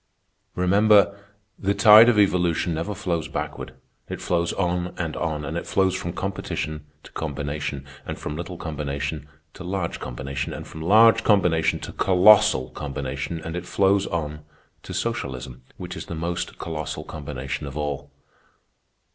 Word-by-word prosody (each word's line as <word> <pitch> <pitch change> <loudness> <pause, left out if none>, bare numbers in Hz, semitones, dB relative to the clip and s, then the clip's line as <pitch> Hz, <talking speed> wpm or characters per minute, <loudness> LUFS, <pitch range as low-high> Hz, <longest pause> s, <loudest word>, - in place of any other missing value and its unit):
Remember, 100 +2 +4 0.4
the 100 +1 0
tide 110 +3 +9
of 115 - +3
evolution 90 -4 +2
never 85 +6 -3
flows 90 -5 -2
backward. 65 - -5 0.3
It - - -5
flows 85 -1 0
on 90 -1 -1
and 80 -3 -3
on, 75 -1 -2
and 80 - -4
it 85 - -4
flows 95 -1 +2
from 85 -2 -4
competition 80 -5 -4 0.2
to - - -14
combination, 70 -2 -4 0.2
and - - -6
from 75 - -5
little 85 +2 -6
combination 75 -1 -4 0.2
to 95 - -10
large 90 -1 -3
combination, 65 +2 -4
and - - -7
from 80 - -9
large 110 +6 +6
combination 90 -6 +3
to - - -7
colossal 90 -9 +5
combination, 70 +2 -4
and 80 +1 -6
it 90 0 -5
flows 100 0 +2
on 75 -3 -3 0.4
to - - -8
socialism, 65 -1 -4 0.2
which - - -7
is - - -7
the 85 - -5
most 85 +2 -3
colossal 80 -2 -5
combination 65 +3 -5
of 70 +1 -7
all. 75 -1 -3
85 Hz, 150 wpm, -24 LUFS, 75-95 Hz, 0.4 s, tide